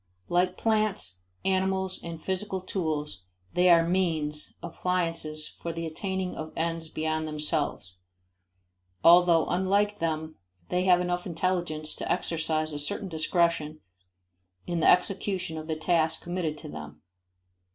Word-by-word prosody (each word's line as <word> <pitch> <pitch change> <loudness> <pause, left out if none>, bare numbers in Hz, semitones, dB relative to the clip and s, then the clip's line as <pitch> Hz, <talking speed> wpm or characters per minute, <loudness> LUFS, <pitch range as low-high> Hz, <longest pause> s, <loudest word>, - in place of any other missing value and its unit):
Like 180 +1 +2
plants, 215 - +1 0.2
animals 190 0 +1
and 170 -1 -6
physical 190 +3 -2
tools, 155 - -3 0.3
they 180 0 +4
are 165 -1 +6
means, 160 -5 0
appliances, 165 -3 -2
for 170 - -6
the 165 0 -4
attaining 190 +3 -3
of 155 0 -6
ends 165 0 -2
beyond 155 0 -1
themselves, 150 - -2 1.1
although 170 -1 +7
unlike 200 +3 +1
them 160 -1 -2 0.3
they 180 +1 +1
have 180 -1 +5
enough 180 0 -1
intelligence 170 -3 -1
to - - -3
exercise 155 -1 0
a 145 - -3
certain 150 +6 -1
discretion 160 -1 +1 0.9
in 175 -1 -1
the - - +5
execution 185 -1 +1
of 155 - -8
the 160 - -1
tasks 160 0 +1
committed 175 -3 -2
to - - -9
them. 75 0 -9
165 Hz, 130 wpm, -28 LUFS, 155-185 Hz, 1.1 s, although